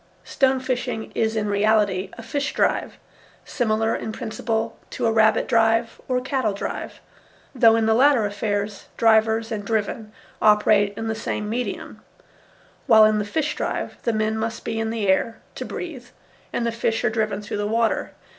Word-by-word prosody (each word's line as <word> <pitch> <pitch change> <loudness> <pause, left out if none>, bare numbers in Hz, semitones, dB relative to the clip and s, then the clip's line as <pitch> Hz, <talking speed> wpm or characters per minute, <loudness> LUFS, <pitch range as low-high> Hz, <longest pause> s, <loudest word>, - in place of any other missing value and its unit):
Stone 265 -1 +1
fishing 250 -3 -3
is 220 0 0
in 215 -1 0
reality 205 -2 +2
a 230 - -8
fish 285 +4 -3
drive, - - 0 0.5
similar 225 -2 0
in 220 - -4
principle 225 -1 -3
to 245 - -3
a 225 - +3
rabbit 220 0 +3
drive 225 0 +2
or 255 - +1
a - - -1
cattle 260 -6 0
drive, 200 - -5 0.5
though 230 -4 +5
in 225 -1 +2
the 220 - +3
latter 255 -1 +4
affairs 205 0 -3
drivers 220 0 +3
and 210 -2 -3
driven 215 0 -2 0.3
operate 210 -1 +4
in 225 - -3
the 220 - 0
same 215 -1 -3
medium, 240 +3 -4 0.9
while 220 -3 +8
in 215 0 +3
the - - 0
fish 300 +8 -2
drive - - -3
the 235 - 0
men 215 0 0
must 225 0 -4
be 225 - -2
in 225 0 -1
the 220 -3 -2
air 190 +4 +1 0.2
to - - -6
breathe 285 -9 -7 0.4
and 235 - -1
the 235 - 0
fish 225 -1 -1
are 230 - +2
driven 215 -2 -1
through 210 0 -5
the 205 0 -1
water. 225 +1 0
225 Hz, 175 wpm, -23 LUFS, 215-235 Hz, 0.9 s, while